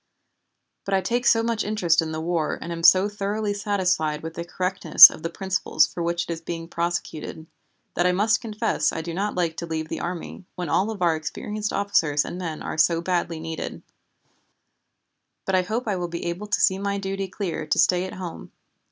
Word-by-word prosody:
But 195 - 0
I 190 - +2
take 240 +6 -1
so 225 -1 +4
much 230 -1 -1
interest 180 -6 +2
in 160 -1 -4
the 155 - -4
war 165 -1 -1
and 170 - -6
am 165 0 -4
so 185 +4 +6
thoroughly 205 +1 -2
satisfied 185 -7 0
with 160 0 -6
the 170 - -5
correctness 180 -1 +7
of - - -10
the 165 - -3
principles 190 +2 +1
for 175 - -7
which 170 +1 0
it - - -6
is 165 - -8
being 165 0 -6
prosecuted, 170 -2 -4 0.5
that 175 - +2
I - - +3
must 215 +4 +2
confess 220 -1 -1
I 160 - -4
do 170 0 -5
not 200 +4 -2
like 170 -3 0
to 170 - -5
leave 160 -1 -4
the - - -4
army, 175 +1 -6
when 180 -3 -4
all 195 +8 +1
of 205 -5 -4
our 170 -2 +3
experienced 210 +6 -4
officers 160 -8 +1
and 180 - -6
men 165 -4 -5
are - - -4
so 165 +2 +4
badly 170 -2 -1
needed, 160 0 -6 1.6
but 195 - -2
I 185 - +4
hope 220 +6 -3
I 205 - 0
will 175 -1 -3
be 170 0 -6
able 175 +5 -4
to 210 - 0
see 190 0 +3
my 200 0 -2
duty 195 0 -3
clear 180 -5 -4
to - - +1
stay 180 0 +3
at 190 - -7
home. 180 -3 -8
180 Hz, 210 wpm, -24 LUFS, 165-200 Hz, 1.6 s, correctness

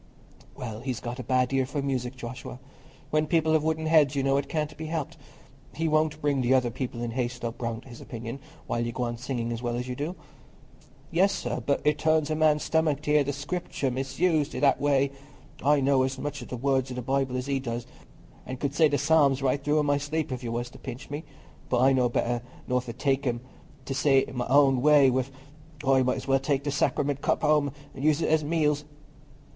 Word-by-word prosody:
"Well, 115 -4 -6
he's 125 -1 -3
got 120 +2 -6
a - - -4
bad 130 +1 +1
ear 135 -1 +2
for 140 +1 -3
music, 130 -2 -2
Joshua. 125 0 -7 0.5
When 155 0 +2
people 160 -1 +2
have 155 -1 +3
wooden 160 0 0
heads, 155 -4 +4
you 135 - +1
know, 135 0 +2
it 140 - -2
can't 150 -1 -2
be 155 +1 -6
helped. 155 -3 -3 0.6
He 165 +1 0
won't 155 0 +1
bring 140 -2 +2
the 125 +1 +3
other 125 -2 +2
people 120 -1 -4
in 120 - -3
Hayslope 120 -1 -3
round 115 0 -3
to - - -15
his 120 - -11
opinion, 115 +2 -6 0.3
while 120 - -1
you 120 - -2
go 125 - -2
on 120 -1 -2
singing 120 -2 -3
as 115 0 -4
well 120 -1 -2
as 125 +1 -3
you 125 - -4
do." 150 +7 -3 1.0
"Yes, 190 +4 +4
sir, 120 0 -3
but 140 +2 0
it 150 0 +2
turns 155 -1 +2
a - - +1
man's 155 -1 +3
stomach 155 -3 +1
t' 150 - -1
hear 150 -1 +5
the 140 - -2
Scripture 145 -1 -3
misused 150 +4 0
i' - - -2
that 140 -2 +3
way. 140 -1 +2 0.5
I 145 +1 +4
know 135 0 +3
as 130 +1 -1
much 145 +2 -4
o' - - -8
the 125 - -5
words 135 +1 +1
o' - - -5
the 125 - -4
Bible 135 0 0
as 125 - -3
he 140 -1 0
does, 120 -2 -4 0.6
an' 130 - -5
could 140 +1 -2
say 160 +1 +5
the 145 -1 +1
Psalms 140 -2 +3
right 135 +1 +1
through 150 +1 +2
i' - - +4
my 145 -1 +2
sleep 145 +1 -2
if 130 0 -4
you 115 - -3
was 120 +1 -3
to - - -13
pinch 125 +4 -8
me; 150 +2 -5 0.4
but 125 - +2
I 135 +2 +5
know 125 -2 +3
better 120 0 0 0.3
nor 125 0 +1
to 120 -2 -7
take 135 +1 0
'em 120 -1 -1 0.4
to 135 - -3
say 135 0 +3
my 125 -1 -2
own 135 0 +5
say 145 -3 +6
wi'. 130 0 +1 0.6
I 135 0 +4
might 130 +1 +1
as 130 +1 -7
well 135 0 +3
take 135 0 0
the 145 - -1
Sacriment 140 0 0
cup - - 0
home 150 -2 +3 0.2
and 135 - -7
use 155 +1 +3
it - - +1
at 160 0 +3
meals." 150 -1 +1
135 Hz, 235 wpm, -27 LUFS, 125-150 Hz, 1.0 s, say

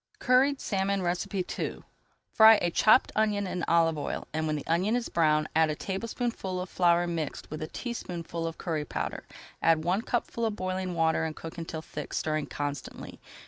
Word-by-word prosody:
CURRIED 265 +2 +3
SALMON 195 -1 -1
II 180 +2 -2 0.5
Fry 220 0 +8
a 175 - 0
chopped 220 +8 +5
onion 210 -2 +1
in 180 -2 -3
olive 165 -2 +3
oil, 145 - -4
and 160 0 -1
when 155 - 0
the 145 - -5
onion 185 +7 +1
is 245 -1 -2
brown 155 -2 +2
add 160 0 +4
a 155 - -1
tablespoonful 195 - -3
of 180 0 -5
flour 175 -1 +3
mixed 165 -4 -4
with 155 - -5
a 155 - -3
teaspoonful 170 -7 -5
of 165 - -6
curry 160 -4 -2
powder. - - -4 0.3
Add 165 -1 +3
one 180 +5 +1
cupful 235 -1 -1
of 215 - -3
boiling 185 -1 -3
water 160 -1 +2
and 160 -1 -3
cook 165 +1 -8
until 160 -1 -5
thick, - - -7
stirring 155 -1 -1
constantly. 145 -2 -5
175 Hz, 180 wpm, -28 LUFS, 160-200 Hz, 0.5 s, Fry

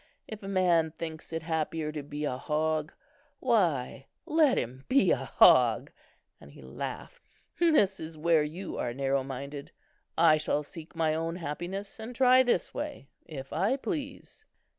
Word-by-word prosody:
If 220 -1 -8
a 195 - -8
man 180 -4 +3
thinks 160 0 -7
it 165 -1 -3
happier 160 -1 -2
to 155 -1 -5
be 145 +1 -5
a 130 - -1
hog, 155 +2 -1 0.5
why, 165 - 0 0.2
let 305 -3 +3
him 130 +3 -3
be 275 +1 +4
a - - +5
hog," - - +5 0.5
and - - -14
he - - -14
laughed. - - -7 0.4
"This 295 - +3
is 160 0 -7
where 165 0 +3
you 165 +6 -5
are 120 0 -2
narrow 135 0 0
minded. 140 +2 -7 0.5
I 160 -2 +6
shall 150 -1 -1
seek 160 +2 -11
my 160 -1 +1
own 165 +1 -2
happiness, 180 +6 -5
and 230 +3 -7
try 255 0 +6
this 245 -2 0
way, 290 - -6 0.2
if 135 -3 -8
I 195 - +1
please." 285 -3 -6
165 Hz, 160 wpm, -29 LUFS, 150-205 Hz, 0.5 s, I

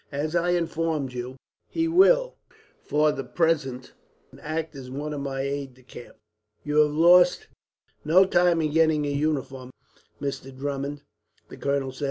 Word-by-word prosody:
As 150 +3 -3
I 175 +1 +1
informed 165 -5 -1
you, 125 +1 -6 0.3
he 330 0 -1
will - - +4 0.5
for 150 +1 +1
the 135 - -5
present 150 -7 -1 0.5
act 155 0 -4
as 130 -2 -9
one 145 +3 -5
of 145 - -5
my 135 -1 -3
aides 140 -1 -4
de 130 - -21
camp." 120 -1 -13 0.5
"You 150 0 -2
have 150 -1 +4
lost 175 +3 +5 0.6
no 180 +5 +5
time 175 -3 +2
in 155 - -1
getting 160 -1 +2
your 145 - -2
uniform, 140 -3 -2 0.5
Mr. 135 -1 -6
Drummond," 140 +1 -4 0.5
the - - -11
colonel 140 -1 -1
said. 130 - -14
150 Hz, 155 wpm, -25 LUFS, 135-165 Hz, 0.6 s, lost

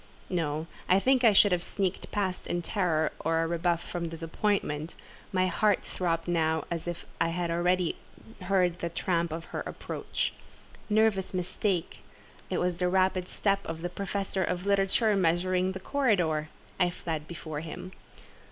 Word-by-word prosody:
No; 160 -3 -1 0.2
I 185 +2 +6
think 260 +4 +3
I 225 - +8
should 205 0 +6
have 180 -1 +2
sneaked 190 +1 -2
past 190 -3 -2
in 175 0 -1
terror 165 -5 +1
of 165 - +1
a 165 0 +2
rebuff 170 0 0
from 170 -2 -3
Disappointment: 165 -1 -1 0.4
my 185 -2 +2
heart 205 +2 +2
throbbed 165 -2 -1
now 160 -2 +1
as 170 0 -3
if 175 -1 -4 0.2
I 165 - +3 0.2
already 175 +1 +1 0.5
heard 180 -2 +2
the 170 - -2
tramp 170 0 0
of 165 +1 -4
her - - -1
approach. - - -3 0.6
Nervous 210 -3 +2
mistake! 180 0 -1 0.5
It - - 0
was 180 -1 0
the 180 0 +1
rapid 185 0 +2
step 200 -1 +1
of 165 0 -5
the 175 - -1
Professor 195 0 -2
of 180 +1 -2
Literature 200 +2 +3
measuring 185 +1 +2
the 190 - -5
corridor. 180 - +1 0.3
I 180 - +4
fled 160 -3 -4
before 155 -3 -5
him. 180 +3 -7
180 Hz, 155 wpm, -29 LUFS, 165-190 Hz, 0.6 s, I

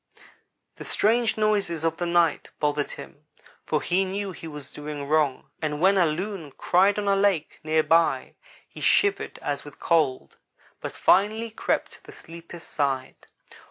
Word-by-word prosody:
"The - - -8
strange 225 +1 +2
noises 200 -7 0
of 165 0 0
the 175 - -2
night 170 -2 +2
bothered 145 -1 0
him, 150 +1 -12 0.4
for 155 - -1
he 185 +2 +2
knew 195 +1 -3
he 165 -2 -9
was 150 -3 -9
doing 150 -1 -6
wrong, 150 -3 0
and 150 -2 -2
when 190 +4 +4
a 180 -3 +4
Loon 165 -2 -4
cried 195 +3 +3
on 205 -1 -2
a 200 - +4
lake 195 -6 +1
near 155 0 +2
by, 165 +1 +2 0.3
he - - -12
shivered 405 -1 +2
as 145 -1 -2
with 145 - -13
cold, 155 -6 +1 0.4
but - - -4
finally 220 +4 +2
crept - - -1
to - - -16
the - - -12
sleeper's 170 0 -11
side. 135 -3 -3
170 Hz, 160 wpm, -25 LUFS, 150-195 Hz, 0.4 s, when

